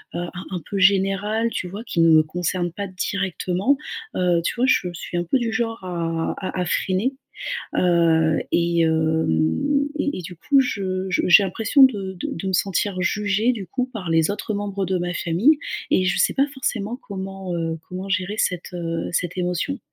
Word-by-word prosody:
heu, - - -1
un 175 - -4 0.2
un 180 - -3
peu 200 - -2
général, 195 +4 +2
tu 185 - -4
vois? 205 +5 -7
Qui 200 -8 -3
ne 165 - +6
me 155 -1 +7
concerne 175 +2 -2
pas 200 +3 -5
directement, 190 +5 -1 0.4
heu, 175 -2 +2
tu - - 0
vois? 245 +2 +2
Je 180 -8 +2
suis 175 +1 -5
un 175 - 0
peu 255 +10 +1
du 230 -2 -1
genre 225 -3 -2
à 165 -2 -2
à 185 -1 -4
à - - 0
freiner. 190 +8 0 0.6
Heu, 165 -3 +3
et 170 0 +2
hem, 160 - +1
et 290 -7 -1
et - - -5
du 175 +2 -8
coup, 275 - +3
je 190 -6 -2
je 175 - +1
j'ai 200 +3 +8
l'impression 225 - +2
de 200 -7 +2
de 180 - -5
de 180 +4 -4
me 190 - -1
sentir 185 +1 0
jugée, 210 +5 +1
du 205 -5 -6
coup, 250 +6 -2
par 185 -6 -5
les 165 -1 +3
autres 210 +1 -4
membres 200 -1 -2
de 185 0 0
ma 175 0 -2
famille, 205 - +3 0.3
et 185 - +3
je 180 - +1
sais - - +3
pas 275 +1 +4
forcément 240 -4 -2
comment, 195 -4 -6
heu, 165 -1 -2
comment 185 +2 -5
gérer 185 +2 -1
cette, 180 -2 -1
heu, 165 -1 -3
cette 175 +1 -1
émotion. 180 +10 -1
185 Hz, 195 wpm, -22 LUFS, 175-205 Hz, 0.6 s, j'ai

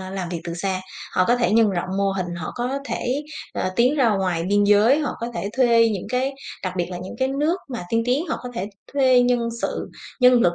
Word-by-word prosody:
ờ, 185 0 -7
làm 190 -3 -4
việc 170 -2 -4
từ 170 -1 -4
xa, 185 +1 -2 0.3
họ 185 - +4
có 240 - +4
thể 235 -3 +1
nhân 225 -2 +5
rộng 180 -1 -2
mô 195 -1 +2
hình, 180 -2 -3
họ 160 - -5
có 255 +3 -2
thể, 270 +1 -2 0.3
ờ, 185 - -1
tiến 250 +5 +3
ra 255 -5 +4
ngoài 185 -4 0
biên 205 0 +3
giới, 210 +7 +5
họ 290 - -1
có 235 - -2
thể 200 - -3
thuê 235 -3 +5
những 205 -4 -3
cái 255 +3 0 0.3
đặc 185 -1 -2
biệt 175 -1 0
là 175 - -5
những 185 +1 -8
cái 260 0 +1
nước 300 +6 +1
mà 240 -8 -5
tiên 230 0 +2
tiến, 275 +8 +1
họ - - -2
có 250 - -6
thể 195 +1 -3 0.2
thuê 260 -3 +5
nhân 245 -1 +1
sự, - - -2 0.3
nhân 250 0 +7
lực 175 -4 +3
230 Hz, 250 wpm, -23 LUFS, 185-250 Hz, 0.3 s, nhân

